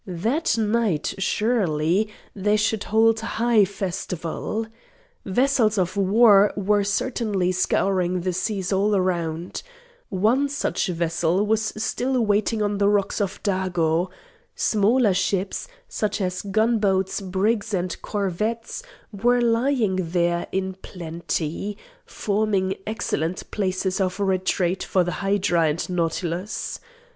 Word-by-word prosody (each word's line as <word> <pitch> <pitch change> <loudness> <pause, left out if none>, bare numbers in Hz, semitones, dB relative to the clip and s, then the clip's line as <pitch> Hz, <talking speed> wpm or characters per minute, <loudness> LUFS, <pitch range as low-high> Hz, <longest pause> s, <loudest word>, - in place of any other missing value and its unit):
That 230 - 0
night, 215 -7 0
surely, 195 -3 +1 0.3
they 205 +1 +1
should 215 0 0
hold 225 +1 +3
high 225 -1 +2
festival. 190 +1 -4 0.6
Vessels 225 +1 +2
of 185 0 0
war 200 +1 +5
were 205 +1 +2
certainly 205 -3 0
scouring 185 0 +1
the 185 +1 -1
seas 195 0 -2
all 205 +2 +2
around. 175 -3 -1 0.5
One 225 +9 +2
such 285 - -1
vessel 170 +2 0
was 215 0 +1
still 250 +4 -1
wanting 215 +1 +1
on 205 -1 -1
the 200 0 +4
rocks 205 0 +1
of 195 -1 -3
Dago. 180 -3 0 0.5
Smaller 215 +1 +3
ships, 190 - -1 0.2
such 210 -1 -2
as 185 -2 -2
gunboats, 205 -2 +1
brigs 200 +4 0
and 180 -2 -1
corvettes, 215 - -2 0.3
were 245 +4 +2
lying 235 -3 +2
there 175 0 0
in 190 0 -2
plenty, 170 +2 -4 0.3
forming 200 -2 0
excellent 185 -5 -2
places 190 -1 -1
of 185 +1 -1
retreat 185 -1 0
for 185 - +1
the 175 - -2
hydra 195 -4 +2
and 150 +3 -2
nautilus. 175 +2 -2
195 Hz, 115 wpm, -23 LUFS, 180-215 Hz, 0.6 s, war